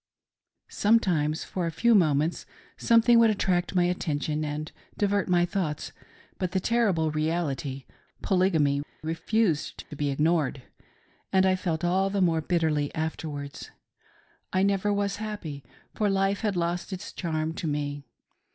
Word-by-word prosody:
Sometimes 175 Hz, -8 st, +2 dB
for 180 Hz, -3 st, -3 dB
a -, -, -2 dB
few 235 Hz, +8 st, +3 dB
moments 160 Hz, -4 st, +2 dB, 0.3 s
something 230 Hz, 0 st, +5 dB
would 230 Hz, -1 st, +6 dB
attract 185 Hz, -3 st, 0 dB
my 180 Hz, -, +4 dB
attention 155 Hz, -3 st, -1 dB
and 150 Hz, +1 st, -4 dB, 0.3 s
divert 200 Hz, -1 st, +1 dB
my 175 Hz, -1 st, +4 dB
thoughts; 170 Hz, -5 st, -3 dB, 0.5 s
but 185 Hz, -1 st, -2 dB
the 190 Hz, -, +2 dB
terrible 190 Hz, -8 st, +1 dB
reality 155 Hz, -4 st, -2 dB, 0.2 s
— -, -, -38 dB
Polygamy, 160 Hz, -7 st, +2 dB, 0.2 s
refused 165 Hz, +1 st, -1 dB
to -, -, -6 dB
be 145 Hz, 0 st, -1 dB
ignored, 150 Hz, -2 st, +1 dB, 0.7 s
and 190 Hz, 0 st, +4 dB
I 190 Hz, 0 st, +4 dB
felt 175 Hz, -3 st, -2 dB
all 190 Hz, +3 st, +2 dB
the 200 Hz, 0 st, -1 dB
more 165 Hz, -4 st, +2 dB
bitterly 155 Hz, -3 st, 0 dB
afterwards. 155 Hz, -3 st, -5 dB, 0.8 s
I 185 Hz, +1 st, +2 dB
never 200 Hz, +1 st, +1 dB
was 200 Hz, 0 st, 0 dB
happy, 205 Hz, -10 st, -6 dB, 0.3 s
for 210 Hz, -1 st, 0 dB
life 195 Hz, +1 st, +1 dB
had 210 Hz, -3 st, 0 dB
lost 175 Hz, +2 st, -2 dB
its 190 Hz, +1 st, -6 dB
charm 160 Hz, -2 st, -2 dB
to 165 Hz, -, -4 dB
me. 145 Hz, -1 st, -2 dB
175 Hz, 140 wpm, -27 LUFS, 155-195 Hz, 0.8 s, would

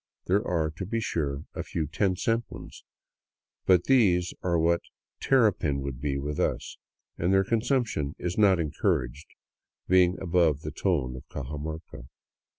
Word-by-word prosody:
There 100 Hz, +4 st, +2 dB
are, 80 Hz, -3 st, 0 dB
to 95 Hz, -, -4 dB
be 115 Hz, +2 st, -1 dB
sure, 75 Hz, -9 st, -2 dB
a -, -, -4 dB
few 80 Hz, -, -3 dB
ten 95 Hz, +5 st, 0 dB
cent 115 Hz, +5 st, 0 dB
ones, -, -, -11 dB, 0.8 s
but 90 Hz, -2 st, +5 dB
these 95 Hz, -9 st, +3 dB
are 85 Hz, -2 st, +1 dB
what 85 Hz, +1 st, +2 dB, 0.4 s
terrapin 100 Hz, -, +2 dB
would 70 Hz, -2 st, -5 dB
be 70 Hz, -1 st, -1 dB
with 75 Hz, +1 st, -4 dB
us, -, -, -2 dB, 0.4 s
and 85 Hz, +3 st, +1 dB
their 95 Hz, 0 st, +4 dB
consumption 115 Hz, -, 0 dB
is 90 Hz, 0 st, -3 dB
not 100 Hz, -4 st, +4 dB
encouraged, 70 Hz, -3 st, -1 dB, 0.6 s
being 90 Hz, 0 st, +4 dB
above 85 Hz, -5 st, +2 dB
the 75 Hz, -, -5 dB
tone 75 Hz, -6 st, -1 dB
of 65 Hz, -, -11 dB
Cajamarca. 75 Hz, -2 st, -6 dB
85 Hz, 150 wpm, -27 LUFS, 75-95 Hz, 0.8 s, but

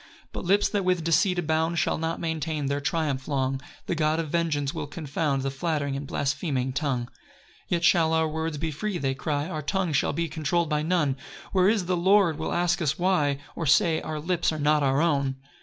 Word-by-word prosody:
3 -, -, -30 dB
But -, -, -5 dB
lips, 200 Hz, +3 st, +4 dB
that 205 Hz, -2 st, 0 dB
with 180 Hz, -2 st, +1 dB
deceit 180 Hz, +3 st, +2 dB
abound, 160 Hz, 0 st, 0 dB
Shall -, -, +1 dB
not 165 Hz, +1 st, -2 dB
maintain 160 Hz, -2 st, -2 dB
their 140 Hz, +1 st, -1 dB
triumph 140 Hz, -2 st, -1 dB
long; 135 Hz, -2 st, -1 dB, 0.2 s
The -, -, -1 dB
God 155 Hz, -1 st, +1 dB
of 160 Hz, -3 st, -3 dB
vengeance 150 Hz, -5 st, 0 dB
will -, -, -4 dB
confound 145 Hz, -2 st, -2 dB
The 135 Hz, -, -1 dB
flattering 145 Hz, -1 st, -2 dB
and 140 Hz, +1 st, -5 dB
blaspheming 135 Hz, -2 st, -1 dB
tongue. 135 Hz, -4 st, -1 dB
4 125 Hz, -, -20 dB, 0.5 s
"Yet 170 Hz, -1 st, 0 dB
shall 170 Hz, -2 st, +4 dB
our 160 Hz, 0 st, +2 dB
words 160 Hz, 0 st, -3 dB
be 160 Hz, +2 st, -2 dB
free," 190 Hz, +6 st, -3 dB
they 135 Hz, -4 st, -1 dB
cry, 145 Hz, +2 st, -2 dB
"Our 155 Hz, -4 st, -4 dB
tongue 180 Hz, +2 st, -1 dB
shall 140 Hz, -, +2 dB
be 165 Hz, +3 st, -1 dB
controll'd 160 Hz, +2 st, -1 dB
by 150 Hz, 0 st, +1 dB
none: 155 Hz, -5 st, +1 dB, 0.3 s
"Where 185 Hz, 0 st, +4 dB
is 210 Hz, -4 st, +1 dB
the 180 Hz, +1 st, 0 dB
Lord 185 Hz, -3 st, +3 dB
will 160 Hz, -, -2 dB
ask 175 Hz, 0 st, +1 dB
us 155 Hz, -2 st, 0 dB
why? 175 Hz, -6 st, +2 dB, 0.2 s
"Or 165 Hz, -, -3 dB
say, 165 Hz, +1 st, +4 dB
our 155 Hz, -1 st, -4 dB
lips 170 Hz, +2 st, 0 dB
are 155 Hz, -, -3 dB
not 150 Hz, 0 st, +3 dB
our 135 Hz, +1 st, +2 dB
own?" 140 Hz, -5 st, +1 dB
160 Hz, 215 wpm, -26 LUFS, 145-170 Hz, 0.5 s, lips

